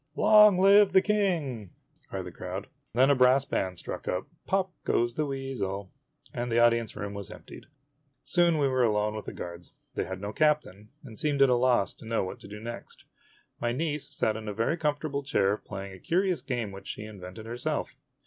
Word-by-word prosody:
" - - -40
Long 210 -3 +7
live 200 +1 +6
the 190 - +7
King! 165 - 0 0.2
" - - -36
cried - - -4
the - - -7
crowd. - - -6 0.3
Then 130 +3 +5
a - - +5
brass 130 +1 +5
band 95 -9 -2
struck - - -6
up 90 +1 -1 0.2
"Pop 190 -1 +1
Goes 120 0 +1
the 150 +3 -1
Weasel," 125 -9 -4 0.4
and 120 0 -3
the 115 - +2
audience 115 -1 +3
room 100 0 -5
was 100 -3 -6
emptied. - - -12 0.6
Soon 170 -2 +3
we 145 -2 +2
were 130 -1 +1
alone 105 -2 +1
with 110 - -6
the - - -5
guards. 85 0 -8 0.2
They - - -2
had 95 0 -6
no 100 +2 -5
captain, 150 -10 +1
and 115 -6 -8
seemed 145 -2 +3
at 135 - +5
a 125 - +4
loss 120 -6 +2
to 110 - -13
know 115 -2 0
what 95 - -6
to - - -12
do 105 +1 -8
next. 120 +2 -8 0.6
My 120 0 0
niece 150 0 -2
sat 110 -6 0
in 110 0 -7
a 105 - -4
very 115 +9 +1
comfortable 150 -2 -1
chair 105 -8 +1
playing 100 -2 -8
a 95 - -11
curious 180 - +1
game 120 -6 -3
which 95 0 -10
she - - -6
invented 100 0 -9
herself. 120 +2 -3
120 Hz, 205 wpm, -28 LUFS, 105-150 Hz, 0.6 s, Long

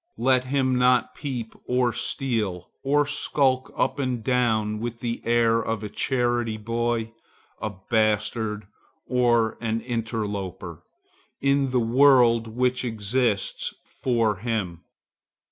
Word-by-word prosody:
Let 130 0 +2
him 130 -1 +1
not 125 0 +3
peep 125 -6 -5
or 125 -1 +2
steal, 110 - -2
or 145 +2 +3
skulk 130 -2 +1
up - - 0
and 125 -4 -2
down 110 -4 +1
with 115 +1 -5
the 120 -1 -3
air 115 -1 +3
of 110 -1 -3
a 105 - -4
charity 120 -1 0
boy, 115 +1 -2 0.5
a 110 - -1 0.2
bastard, 110 -1 0 0.4
or 120 -3 +2
an 115 0 0
interloper 110 -5 -4 0.6
in 140 0 +2
the 125 0 +1
world 120 -1 +5
which 125 +3 0
exists 110 -2 -1
for 115 -5 0
him. 95 -6 -3
120 Hz, 115 wpm, -25 LUFS, 110-125 Hz, 0.6 s, world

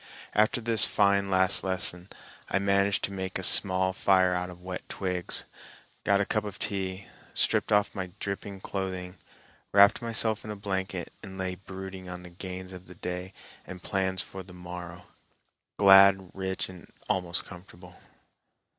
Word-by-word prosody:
After 110 +3 +3
this 115 -2 +5
fine 100 -1 +3
last 95 -3 +4
lesson 95 -1 0 0.4
I - - +1
managed 100 0 +2
to - - -1
make 95 -1 -4
a 95 - -6
small 95 0 +3
fire 95 -1 +3
out 90 0 -2
of 90 0 -12
wet 90 0 -7
twigs, 90 -3 +1 0.6
got 100 0 +3
a 100 - +1
cup 105 +1 0
of 105 -2 -7
tea, 95 -1 -3 0.3
stripped - - +2
off 105 0 +3
my 95 -3 -4
dripping 100 0 -5
clothing, 95 -2 -5 0.5
wrapped 100 +3 +6
myself 115 -2 +2
in 110 - -8
a 105 - -4
blanket 95 -3 -4
and 95 -2 -9
lay 95 -1 -2
brooding 95 0 -9
on 90 0 -8
the 90 - -11
gains 95 +1 -7
of 90 0 -11
the 90 - -12
day 90 +2 -5 0.4
and 90 -1 -9
plans 95 -1 -1
for 95 - -9
the 90 0 -13
morrow, 90 -1 -9 0.7
glad, 95 -1 +7
rich, 95 0 -3
and 90 -2 -13 0.2
almost 90 -1 -1
comfortable. 90 -1 -13
95 Hz, 160 wpm, -28 LUFS, 90-100 Hz, 0.7 s, glad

